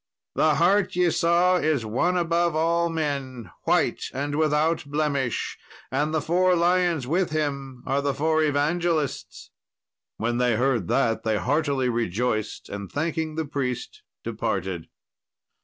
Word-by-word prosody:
The 155 Hz, -1 st, +3 dB
hart 190 Hz, +3 st, +2 dB
ye 180 Hz, -1 st, +3 dB
saw 175 Hz, +3 st, +3 dB
is 155 Hz, -8 st, 0 dB
One 170 Hz, +12 st, +1 dB
above 170 Hz, -1 st, +1 dB
all 170 Hz, +2 st, +2 dB
men, 135 Hz, -, -3 dB
white -, -, +1 dB
and 145 Hz, +2 st, -2 dB
without 155 Hz, +1 st, +1 dB
blemish, 140 Hz, -4 st, -1 dB, 0.3 s
and 150 Hz, +1 st, 0 dB
the 155 Hz, -1 st, 0 dB
four 180 Hz, +2 st, +3 dB
lions 175 Hz, -4 st, +2 dB
with 175 Hz, +7 st, +1 dB
Him 140 Hz, -4 st, -3 dB
are 135 Hz, +2 st, 0 dB
the 140 Hz, -1 st, -1 dB
four 160 Hz, +2 st, +1 dB
evangelists." 155 Hz, 0 st, -1 dB, 0.7 s
When 120 Hz, +2 st, -1 dB
they 125 Hz, -2 st, +2 dB
heard 120 Hz, -6 st, +1 dB
that 115 Hz, +5 st, +1 dB
they 110 Hz, -1 st, 0 dB
heartily 140 Hz, +1 st, 0 dB
rejoiced, 115 Hz, -1 st, -1 dB
and 100 Hz, -1 st, -7 dB
thanking 160 Hz, +1 st, -2 dB
the 160 Hz, 0 st, -2 dB
priest, 135 Hz, -4 st, -4 dB, 0.2 s
departed. 90 Hz, -3 st, -3 dB
150 Hz, 135 wpm, -25 LUFS, 125-165 Hz, 0.7 s, The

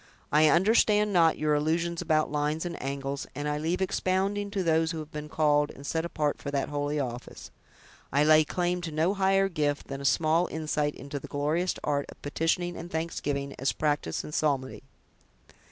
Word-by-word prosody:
I 155 Hz, +1 st, +5 dB
understand 210 Hz, +3 st, +4 dB
not 165 Hz, -3 st, +4 dB
your 150 Hz, 0 st, +1 dB
allusions 165 Hz, +3 st, 0 dB
about 155 Hz, -3 st, +1 dB
lines 150 Hz, +2 st, -1 dB
and 170 Hz, -1 st, -4 dB
angles; 135 Hz, +1 st, -4 dB
and 145 Hz, 0 st, -3 dB
I 150 Hz, 0 st, -1 dB
leave 170 Hz, +5 st, 0 dB
expounding 195 Hz, +2 st, 0 dB
to 200 Hz, -2 st, -2 dB
those 160 Hz, -1 st, +2 dB
who 165 Hz, -, -3 dB
have 155 Hz, 0 st, -7 dB
been 150 Hz, -1 st, -6 dB
called 150 Hz, -1 st, +2 dB
and 140 Hz, -, -11 dB
set 160 Hz, +3 st, -1 dB
apart 150 Hz, -3 st, -1 dB
for 140 Hz, -, -4 dB
that 140 Hz, -1 st, -1 dB
holy 145 Hz, 0 st, -1 dB
office. 125 Hz, -2 st, -6 dB, 0.6 s
I 145 Hz, +2 st, +3 dB
lay 155 Hz, 0 st, +6 dB
claim 180 Hz, +3 st, -1 dB
to 165 Hz, -2 st, -5 dB
no 160 Hz, +5 st, +1 dB
higher 195 Hz, 0 st, +3 dB
gift 150 Hz, -5 st, -2 dB
than 135 Hz, 0 st, -5 dB
a -, -, -6 dB
small 160 Hz, +4 st, +3 dB
insight 150 Hz, -2 st, -1 dB
into 140 Hz, +1 st, -6 dB
the -, -, -9 dB
glorious 155 Hz, +6 st, 0 dB
art 140 Hz, -1 st, 0 dB
of -, -, -12 dB
petitioning 165 Hz, +4 st, -1 dB
and 170 Hz, -, -7 dB
thanksgiving, 145 Hz, -4 st, -3 dB
as 135 Hz, -, +1 dB
practiced 145 Hz, -, -1 dB
in -, -, -8 dB
psalmody." 140 Hz, -4 st, -1 dB
155 Hz, 185 wpm, -28 LUFS, 145-170 Hz, 0.6 s, lay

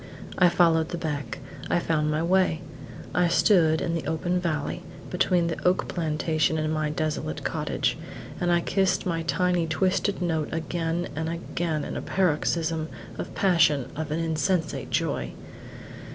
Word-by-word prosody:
I 180 Hz, -1 st, +7 dB
followed 165 Hz, -2 st, +3 dB
the 175 Hz, -, -3 dB
beck. 150 Hz, -3 st, -3 dB, 0.3 s
I -, -, +3 dB
found 155 Hz, -3 st, +1 dB
my 155 Hz, +1 st, 0 dB
way. 185 Hz, -2 st, +2 dB, 0.5 s
I 180 Hz, -1 st, +3 dB
stood 170 Hz, -3 st, +4 dB
in 165 Hz, -, -1 dB
the 165 Hz, -4 st, -2 dB
open 175 Hz, +3 st, 0 dB
valley, 165 Hz, -1 st, -2 dB, 0.3 s
between 180 Hz, -1 st, +2 dB
the 165 Hz, -1 st, -3 dB
oak 180 Hz, +1 st, +2 dB
plantation 155 Hz, -1 st, 0 dB
and 155 Hz, 0 st, 0 dB
my 155 Hz, -1 st, 0 dB
desolate 155 Hz, 0 st, -2 dB
cottage, -, -, -1 dB, 0.4 s
and 175 Hz, 0 st, +1 dB
I 175 Hz, 0 st, +4 dB
kissed 190 Hz, 0 st, +1 dB
my 165 Hz, -2 st, 0 dB
tiny, 170 Hz, +2 st, +1 dB
twisted 185 Hz, +4 st, +1 dB
note 160 Hz, -4 st, 0 dB
again 165 Hz, +1 st, -2 dB
and 160 Hz, +1 st, -2 dB
again 165 Hz, -2 st, -2 dB
in -, -, -5 dB
a -, -, -3 dB
paroxysm 160 Hz, -2 st, 0 dB, 0.3 s
of -, -, -5 dB
passion 160 Hz, -8 st, +3 dB
and -, -, -7 dB
of 155 Hz, -1 st, -3 dB
insensate 160 Hz, +1 st, 0 dB
joy. -, -, -1 dB
165 Hz, 150 wpm, -26 LUFS, 155-175 Hz, 0.5 s, I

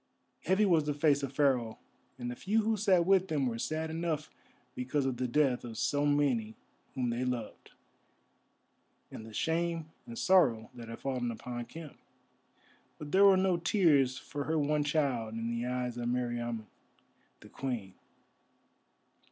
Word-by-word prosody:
Heavy 190 Hz, +5 st, +3 dB
was 165 Hz, -6 st, +3 dB
the 150 Hz, -1 st, -1 dB
face 145 Hz, -1 st, +3 dB
of 135 Hz, -2 st, -3 dB
Pharaoh, 130 Hz, -5 st, +1 dB, 0.4 s
and 120 Hz, -1 st, -4 dB
the -, -, -6 dB
few 215 Hz, -, +1 dB
who 220 Hz, +1 st, +1 dB
sat 190 Hz, -4 st, +3 dB
with 190 Hz, -1 st, +3 dB
him 145 Hz, -3 st, +1 dB
were 115 Hz, -2 st, -2 dB
sad 160 Hz, +3 st, -2 dB
enough 160 Hz, -2 st, -2 dB, 0.4 s
because 130 Hz, +3 st, -1 dB
of 130 Hz, -2 st, -1 dB
the 125 Hz, 0 st, -1 dB
death 135 Hz, -1 st, +2 dB
of 115 Hz, -2 st, -7 dB
so 145 Hz, +5 st, +1 dB
many 130 Hz, -7 st, +1 dB, 0.4 s
whom 125 Hz, -3 st, 0 dB
they 120 Hz, +2 st, -2 dB
loved, 125 Hz, -3 st, -4 dB, 1.4 s
and -, -, -8 dB
the -, -, -10 dB
shame 165 Hz, +5 st, -1 dB, 0.2 s
and 235 Hz, -1 st, -8 dB
sorrow 180 Hz, -, +3 dB
that 120 Hz, -2 st, -10 dB
had 115 Hz, -, -6 dB
fallen 125 Hz, -3 st, -2 dB
upon 120 Hz, +1 st, -5 dB
Khem. 160 Hz, +2 st, -11 dB, 1.0 s
But 150 Hz, -1 st, -8 dB
there 195 Hz, +1 st, +6 dB
were 195 Hz, -1 st, +7 dB
no 185 Hz, -2 st, +2 dB
tears 155 Hz, -8 st, +3 dB
for 145 Hz, -1 st, -5 dB
her 160 Hz, +3 st, 0 dB
one 150 Hz, 0 st, +1 dB
child 135 Hz, -7 st, 0 dB
in 115 Hz, +1 st, -3 dB
the 120 Hz, +1 st, -2 dB
eyes 125 Hz, -1 st, -2 dB
of 120 Hz, 0 st, -2 dB
Meriamun 120 Hz, -2 st, -2 dB, 0.8 s
the -, -, -14 dB
Queen. 120 Hz, -8 st, -4 dB
140 Hz, 160 wpm, -31 LUFS, 120-160 Hz, 1.4 s, were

